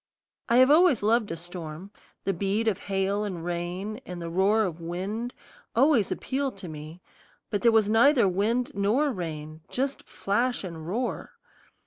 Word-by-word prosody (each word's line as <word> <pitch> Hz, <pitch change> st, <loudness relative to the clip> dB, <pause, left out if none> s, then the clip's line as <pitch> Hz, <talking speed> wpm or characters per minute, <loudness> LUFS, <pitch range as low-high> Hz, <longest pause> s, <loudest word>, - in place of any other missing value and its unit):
I 235 Hz, -, +4 dB
have 260 Hz, +2 st, +7 dB
always 320 Hz, -, +5 dB
loved 220 Hz, 0 st, +2 dB
a 165 Hz, -, -4 dB
storm; 175 Hz, +1 st, -8 dB, 0.3 s
the 195 Hz, -, 0 dB
beat 200 Hz, +5 st, 0 dB
of 200 Hz, -3 st, +1 dB
hail 195 Hz, +1 st, -1 dB
and 180 Hz, -5 st, -4 dB
rain, 180 Hz, +6 st, -4 dB
and 180 Hz, -5 st, -7 dB
the 170 Hz, -1 st, -5 dB
roar 200 Hz, +5 st, +3 dB
of 175 Hz, -4 st, -4 dB
wind 195 Hz, +9 st, -4 dB, 0.4 s
always 255 Hz, -4 st, +4 dB
appeal 275 Hz, 0 st, -2 dB
to 195 Hz, -2 st, -10 dB
me; 155 Hz, +2 st, -9 dB, 0.5 s
but 205 Hz, -, 0 dB
there 235 Hz, -, +5 dB
was 220 Hz, -2 st, +4 dB
neither 235 Hz, +1 st, +5 dB
wind 220 Hz, +7 st, 0 dB
nor 225 Hz, +9 st, +2 dB
rain, 155 Hz, -5 st, -6 dB
just 270 Hz, +2 st, -2 dB
flash 240 Hz, +5 st, 0 dB
and 165 Hz, -4 st, -7 dB
roar. 235 Hz, +7 st, -3 dB
200 Hz, 160 wpm, -27 LUFS, 175-235 Hz, 0.5 s, have